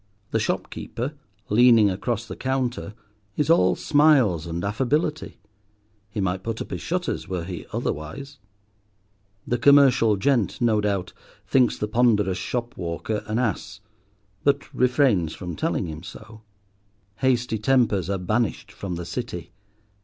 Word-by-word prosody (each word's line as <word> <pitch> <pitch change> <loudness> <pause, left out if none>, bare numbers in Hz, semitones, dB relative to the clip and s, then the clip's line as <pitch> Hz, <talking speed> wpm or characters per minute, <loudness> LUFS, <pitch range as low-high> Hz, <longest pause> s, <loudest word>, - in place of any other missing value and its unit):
The - - +1
shopkeeper, 125 +6 -3 0.4
leaning 115 -2 +6
across 115 +4 -2
the - - -7
counter, 130 -5 -2 0.4
is 150 +2 +2
all 170 - +4
smiles 135 - +3
and 85 +1 -4
affability, 140 +9 -1 0.7
he 105 +1 -5
might 95 -1 -1
put 115 +2 -4
up - - -6
his - - -4
shutters 180 +1 -2
were 90 -3 -3
he 90 -1 -7
otherwise. 135 - -4 1.1
The 120 - -1
commercial 135 -5 +5
gent, 125 -1 +1
no 110 -3 +2
doubt, 100 -3 -1 0.3
thinks 125 -3 +3
the 105 - -2
ponderous 105 -4 +2
shopwalker 105 -4 -3
an 110 +1 -1
ass, 110 -4 -2 0.6
but 140 0 +1
refrains 125 - +2
from 90 -3 -6
telling - - -1
him 80 -2 -7
so. 105 +4 -11 0.8
Hasty 125 -3 +1
tempers 110 -6 +2
are 100 - 0
banished 105 +5 -1
from 95 -3 -5
the 85 0 -5
City. 90 -6 -5
110 Hz, 130 wpm, -24 LUFS, 95-125 Hz, 1.1 s, leaning